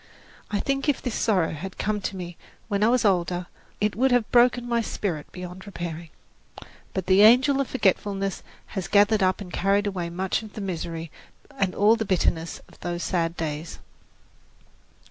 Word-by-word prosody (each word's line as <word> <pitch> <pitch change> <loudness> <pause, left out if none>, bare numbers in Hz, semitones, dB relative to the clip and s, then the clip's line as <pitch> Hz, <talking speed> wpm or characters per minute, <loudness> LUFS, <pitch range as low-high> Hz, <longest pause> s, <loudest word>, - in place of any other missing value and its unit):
I 205 - -1
think 275 +1 0
if 285 - +2
this 245 - -4
sorrow 195 -9 +1
had 180 +5 -7
come 210 0 -1
to 195 - -3
me 175 -2 -6 0.3
when 200 -2 -1
I - - +5
was 245 -1 +3
older, 180 -2 +1 0.3
it 210 0 0
would 265 +4 +3
have 245 -3 +2
broken 245 0 +4
my 235 -1 +1
spirit 175 -9 -4
beyond 180 +2 -8
repairing. 170 -3 -6 0.9
But 190 -2 -1
the 190 +2 +5
angel 260 +6 +6
of 275 - -2
forgetfulness 195 -4 0 0.3
has 190 -3 -3
gathered 205 +1 +4
up 185 +1 +2
and 180 -3 -8
carried 200 +2 +2
away 185 -4 -2
much 185 +4 -1
of 215 -2 -11
the - - -7
misery 165 -3 -4 0.4
and 190 -2 0
all 210 +3 +5
the 225 - -2
bitterness 170 -3 0
of - - -20
those 175 0 -3
sad 170 -2 -1
days. 155 0 -4
195 Hz, 175 wpm, -25 LUFS, 175-215 Hz, 0.9 s, angel